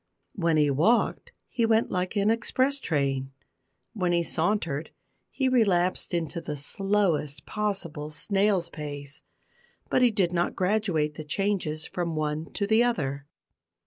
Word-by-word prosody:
When 165 -4 +1
he 150 -2 +3
walked 190 - +2 0.2
he 235 - -1
went 225 0 +3
like 185 +2 -1
an 205 +1 +3
express 260 +5 +1
train; 135 - -1 0.6
when 180 -6 0
he 170 0 +2
sauntered 165 -4 -1 0.4
he 265 - 0
relapsed 195 -8 +2
into 170 -1 -2
the 150 -3 -5
slowest 165 -3 0
possible 190 -8 -3
snail's 195 +2 +1
pace, 145 -2 -6 0.7
but - - +3
he 250 - +6
did 190 -5 0
not 175 0 0
graduate 185 -6 +1
the 155 - -5
changes 160 -2 -1
from 170 -2 -3
one 155 +1 -2
to 200 - -1
the 220 +3 +4
other. 140 - -1
175 Hz, 140 wpm, -27 LUFS, 150-210 Hz, 0.7 s, he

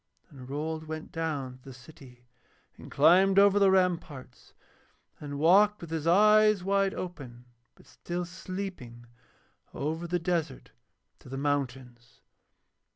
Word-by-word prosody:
And 130 -3 -12
Rold 155 +3 -4
went 155 0 -7
down 145 -6 -4
through 135 +1 -12
the - - -15
city 125 -2 -17 0.5
and - - -13
climbed 185 +6 +4
over 200 0 +5
the 200 -1 +4
ramparts, 170 -9 -2 0.6
and 145 -1 -7
walked 200 +7 +4
with 170 -2 -10
his 160 -1 -3
eyes 215 +2 +4
wide 195 0 0
open 130 -9 -8 0.3
but - - -21
still 175 0 -6
sleeping 180 -10 -8 0.7
over 160 +4 -4
the 175 +1 -1
desert 165 - -3 0.5
to - - -15
the 135 - -6
mountains. 130 -4 -4
160 Hz, 130 wpm, -28 LUFS, 135-185 Hz, 0.7 s, over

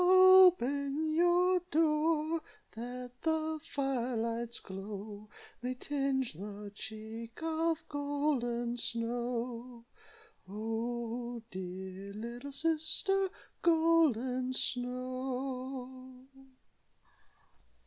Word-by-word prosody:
"Open 340 -6 +6
your 355 +2 +4
door, 315 0 +2 0.3
That 245 +2 -6
the 315 -1 0
fire 265 -5 -1
light's 230 +1 -2
glow 205 +2 -7 0.3
May 250 +1 -2
tinge 270 - -1
the 205 +4 -7
cheek 220 +2 -8
Of 325 0 0
Golden 280 -5 0
Snow 235 0 -2 0.6
Oh! 235 +2 -3
dear 190 +1 -6
little 235 +6 -6
sister, 330 +6 +1 0.3
Golden 290 -7 +3
Snow." 255 0 -3
255 Hz, 70 wpm, -33 LUFS, 230-305 Hz, 0.6 s, Open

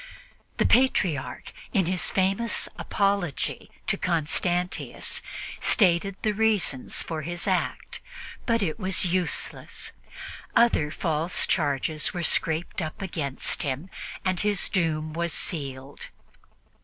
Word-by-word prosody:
The - - +3
Patriarch, 185 - +2 0.2
in 195 -6 +3
his 180 +1 +2
famous 195 +4 +3
"Apology 200 -7 -1 0.2
to - - +1
Constantius," 175 +1 0 0.4
stated 190 -1 +3
the 215 - +2
reasons 210 -10 0
for 160 -2 -4
his 175 +3 -4
act, - - -1 0.5
but 230 -3 +2
it 160 +2 -2
was 190 -1 +3
useless; 180 0 0 0.6
other 230 -11 +4
false 160 +1 +1
charges 150 0 0
were 175 - -2
scraped 160 +2 +1
up 155 -1 -5
against 155 -8 -2
him, 145 +6 -3 0.3
and 185 -2 +1
his 205 -2 +2
doom 155 -5 0
was 170 0 -1
sealed. 135 -4 -2
175 Hz, 110 wpm, -26 LUFS, 155-195 Hz, 0.6 s, other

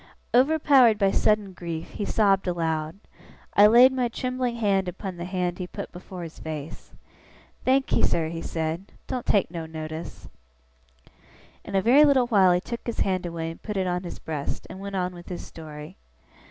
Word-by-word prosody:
Overpowered 265 -3 +5
by 195 -2 +3
sudden 210 -2 +1
grief, 170 -2 -6
he 205 - -4
sobbed 195 -3 +2
aloud. 160 -2 -1 0.6
I 205 +1 +7
laid 245 +4 +7
my 255 -2 +1
trembling 255 0 -2
hand 200 -4 +1
upon 185 +1 -5
the 175 0 -6
hand 180 -1 -2
he 180 - -4
put - - -7
before 180 0 -9
his 165 -1 -9
face. 155 -1 -7 0.7
'Thankee, 265 +1 +2
sir,' 160 -2 +1
he 165 0 -5
said, 165 +4 -4
'doen't 250 -2 -4
take 200 -5 +2
no 165 -2 -5
notice.' 160 0 -7 1.4
In - - -6
a 190 - +2
very 265 +6 +6
little 275 -4 +5
while 200 -6 +4
he 175 - +3
took 235 +6 -7
his 235 - -2
hand 185 -2 0
away 165 -1 -4
and 165 - -13
put 210 -2 -4
it 190 - +1
on 180 0 -1
his 175 - -7
breast, 150 -3 -5
and 190 - -9
went 200 0 -6
on 180 -1 -1
with 175 -1 -12
his 180 - -6
story. 155 +2 -10
185 Hz, 180 wpm, -25 LUFS, 165-225 Hz, 1.4 s, I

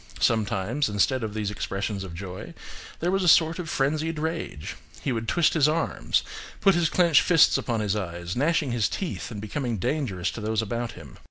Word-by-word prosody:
Sometimes, 110 +4 +1
instead 115 +6 +1
of 110 -1 -4
these 105 -2 -2
expressions 100 0 -3
of 90 -3 -8
joy, 95 - -7 0.5
there 175 +2 +1
was 195 0 +1
a - - +1
sort 160 +1 +5
of 170 -3 -4
frenzied 155 +4 0
rage: 160 - -4 0.3
he 140 - -1
would 115 -2 -2
twist 170 +4 +3
his 150 -2 +4
arms, 165 +2 0 0.4
put 195 - +5
his 170 -2 +2
clenched 170 -4 +5
fists 165 -4 +5
upon 115 -3 -1
his 105 -1 0
eyes, 85 -3 -4
gnashing 150 0 +1
his 120 -3 +1
teeth 190 -9 -4
and 110 -3 -6
becoming 115 +2 -3
dangerous 95 - -1
to 115 - -7
those 110 0 -1
about 115 +2 -3
him. 80 -5 -13
120 Hz, 190 wpm, -26 LUFS, 105-155 Hz, 0.5 s, sort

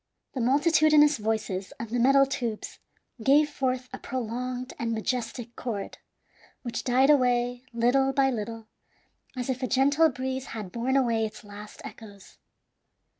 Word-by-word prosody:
The 260 - -3
multitudinous 300 +3 +4
voices 210 -3 -2
of 230 -1 -6
the 245 - 0
metal 275 +3 +5
tubes 240 -5 -4 0.4
gave 285 +6 +5
forth 255 -2 -2
a - - -6
prolonged 250 +1 -4
and 230 -1 -1
majestic 235 +1 -3
chord, 215 -5 -5 0.6
which 240 -3 -4
died 260 +3 +4
away 245 -2 +1
little 245 +3 +2
by 270 0 +2
little, 225 -1 -5 0.7
as 250 - -3
if 260 -1 -2
a 255 - 0
gentle 285 +6 +4
breeze 260 0 -4
had 205 -4 -6
borne 245 +3 -1
away 230 -4 +2
its 215 - -13
last 210 0 -11
echoes. 205 -4 -12
250 Hz, 140 wpm, -27 LUFS, 230-270 Hz, 0.7 s, metal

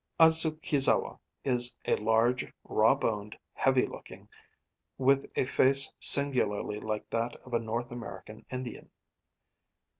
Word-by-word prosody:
Adzukizawa 160 -3 +3 0.2
is 125 -2 +2
large, 115 +3 -1
raw - - +1
boned, 105 -1 -5 0.2
heavy - - 0
looking, - - -13 0.7
with 135 +1 0
a - - -1
face 135 +1 +1
singularly 110 -7 +4
like 110 0 -6
that 115 +1 -3
of 125 - -13
a 115 - +1
North 115 +2 -6
American 110 -2 -11
Indian. 125 -1 -9
120 Hz, 110 wpm, -28 LUFS, 110-135 Hz, 0.7 s, singularly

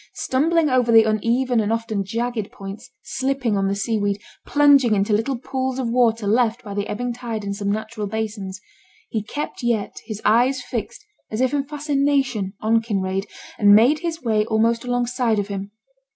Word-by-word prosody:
Stumbling 320 +4 +1
over 255 -3 +2
the 225 -1 +8
uneven 230 +3 +1
and 215 0 0
often 225 -3 -1
jagged 230 +1 -3
points, 195 +1 -9
slipping 265 -4 -1
on 195 0 +1
the 195 - 0
sea 215 +2 -1
weed, 200 0 0 0.3
plunging 280 -6 +5
into 200 +2 +1
little 225 +5 0
pools 260 +1 -3
of 255 -3 -1
water 230 -3 +2
left 230 +3 +1
by 205 -3 -7
the 205 +1 -2
ebbing 245 +3 -3
tide 235 -3 -5
in 200 0 -3
some 200 0 -2
natural 215 0 -3
basins, 205 -2 -4 0.5
he 220 - 0
yet 210 - -10
kept 240 -7 -3
his 215 -3 -5
eyes 245 +5 +4
fixed 245 - -5 0.2
as 215 - -4
if 260 +2 +1
in 280 -1 0
fascination 275 -8 0
on 225 +1 +3
Kinraid, 195 -3 -2 0.3
and 205 -1 +7
made 250 +8 +5
his 330 -1 -4
way 215 -3 +2
almost 230 +1 +1
alongside 245 -2 0
of 205 0 -2
him. 200 0 -4
230 Hz, 180 wpm, -22 LUFS, 210-255 Hz, 0.5 s, the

